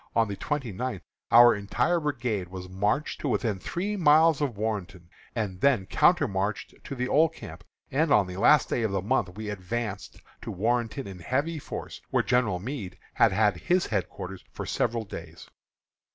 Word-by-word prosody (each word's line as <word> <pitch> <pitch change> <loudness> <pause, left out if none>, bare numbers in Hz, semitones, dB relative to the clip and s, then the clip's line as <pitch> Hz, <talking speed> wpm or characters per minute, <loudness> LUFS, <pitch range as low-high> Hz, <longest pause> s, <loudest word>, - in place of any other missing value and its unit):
On 115 -1 +3
the 100 - -4
twenty 135 +1 -3
ninth 100 -3 -4 0.3
our 120 0 +8
entire 105 - 0
brigade 120 - -2
was 90 0 -8
marched 105 +11 -1
to - - -2
within 110 -7 0
three 195 - -3
miles 160 -3 +5
of 130 -8 -1
Warrenton, 95 -5 -4 0.2
and 100 -5 -3
then 125 -9 +3
countermarched 100 +2 +1
to 140 - -5
the 125 0 -2
old 160 +4 +3
camp; 80 - -10 0.3
and 150 +3 +1
on 105 -6 +5
the 90 0 -7
last 150 +8 +5
day 120 - 0
of 110 - +1
the 95 -2 -1
month 105 -4 0
we 110 -1 -4
advanced 105 +2 -5 0.2
to - - -7
Warrenton 120 +6 -1
in 95 -2 -9
heavy 145 - -1
force, - - -7
where - - +2
General 115 -7 +1
Meade 105 -2 -6 0.2
has - - +4
had 105 -1 +2
his 180 - +1
headquarters 95 -2 -4
for - - -6
several 115 -1 -1
days. - - -10
110 Hz, 175 wpm, -27 LUFS, 95-140 Hz, 0.3 s, our